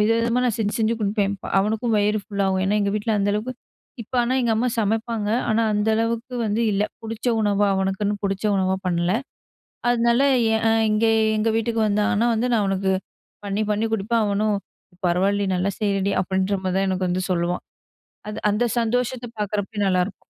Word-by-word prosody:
விதவிதமா 230 +3 +2
நா 250 - +3
செஞ்சு 210 -1 -1
செஞ்சு 225 +1 +2
குடுப்பேன். 200 -1 0
ப - - -13
அவனுக்கும் 220 +3 0
வயிறு 210 +1 +1
ஃபுல்லாகும். 195 -2 0
ஏன்னா, 200 +2 +1
எங்க 200 0 0
வீட்ல 215 +1 0
அந்த 200 +1 +1
அளவுக்கு 230 +5 -3 0.5
இப்ப 225 - -14
ஆனா 245 +2 0
எங்க 235 -2 +2
அம்மா 250 +3 +1
சமைப்பாங்க, 220 0 -1 0.2
ஆனா 225 +1 +2
அந்த 210 +1 0
அளவுக்கு 230 +2 -2
வந்து 215 +2 0
இல்ல. 200 +1 +1 0.2
புடிச்ச 225 +1 -6
உணவா 205 -1 +2
அவனுக்குன்னு 195 +2 0
புடிச்ச 195 +1 -2
உணவா 190 0 +1
பண்ணல. 175 0 +1 0.8
அதனால 235 +1 +3 0.3
எ - - +3 0.4
இங்க 215 +2 +2 0.3
எங்க 220 +1 +1
வீட்டுக்கு 225 0 0
வந்தான்னா 210 +2 +1
வந்து, 230 +2 0
நா - - +4
அவனுக்கு 195 -1 0 0.5
பண்ணி 200 +2 -1
பண்ணி 215 +2 0
குடுப்பேன். 220 +2 +1
அவனும் 205 +1 +1 0.5
"பரவால்லையே, 195 +3 +1
நல்லா 185 +2 0
செய்றடி." 200 -2 0
அப்படீன்ற 190 +2 0
மாரிதான் 190 +1 +1
எனக்கு 185 0 -1
வந்து 185 +1 -1
சொல்லுவான். 175 0 -1 0.6
அத 210 - -5
அந்த 210 +4 +1 0.2
சந்தோஷத்த 245 +2 -1
பார்க்றப்பயே 210 +1 -3
நல்லா 185 -1 +2
இருக்கும். 195 0 -11
210 Hz, 170 wpm, -23 LUFS, 195-225 Hz, 0.8 s, நா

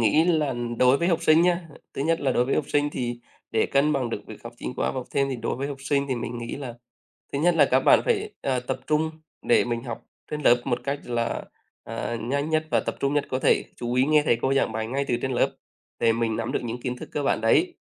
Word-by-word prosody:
nghĩ 115 +8 +4
là 155 -6 +2 0.2
đối 125 +1 +5
với 170 - +1
học 170 -2 +1
sinh 160 +1 +5
nhá, 175 -1 +1 0.3
thứ 135 - -2
nhất 165 +2 +1
là 135 -3 +1
đối 125 - +2
với 135 - 0
học 150 - +1
sinh 145 0 +1
thì 120 -3 -3 0.3
để 110 - +2
cân 140 +2 +2
bằng 130 -5 -1
được - - -3
việc - - -11
học - - -7
chính 60 - -5
khóa - - 0
và - - -8
học 130 -2 -4
thêm 140 0 +1
thì 130 - -2
đối 115 0 -3
với 135 +2 -3
học 140 - -5
sinh 140 +1 0
thì 130 - 0
mình 120 0 -4
nghĩ 120 0 -5
là 130 -4 -6 0.6
thứ 140 - -1
nhất 175 +4 +3
là 155 -3 +6
các 130 - +4
bạn - - +6
phải, 430 -3 0
ờ, 130 -2 0
tập 125 - -4
trung 155 +1 +1 0.3
để - - +4
mình 120 -1 -2
học 120 -3 -6 0.3
trên 150 0 -3
lớp 120 -2 +5
một 125 -2 -1
cách 140 +1 -2
là, 120 -1 -2 0.4
à, 120 - -4
nhanh 140 +6 -1
nhất 155 0 +1
và - - +3
tập - - -2
trung 140 +1 +1
nhất 145 -1 +2
có 130 - 0
thể, - - +3
chú 120 0 -3
ý 125 - +4
nghe 155 0 +4
thầy 120 -6 +3
cô 135 +1 +2
giảng 135 - +1
bài 110 0 -2
ngay 135 +4 -1
từ 120 - +2
trên 130 - -1
lớp 120 - +1 0.4
để 115 -1 +3
mình 115 -1 0
nắm 115 0 -3
được - - 0
những 120 0 -4
kiến 125 -1 -3
thức - - -9
cơ 145 - -1
bản 135 - +1
đấy, 340 - +3
135 Hz, 275 wpm, -25 LUFS, 120-150 Hz, 0.6 s, là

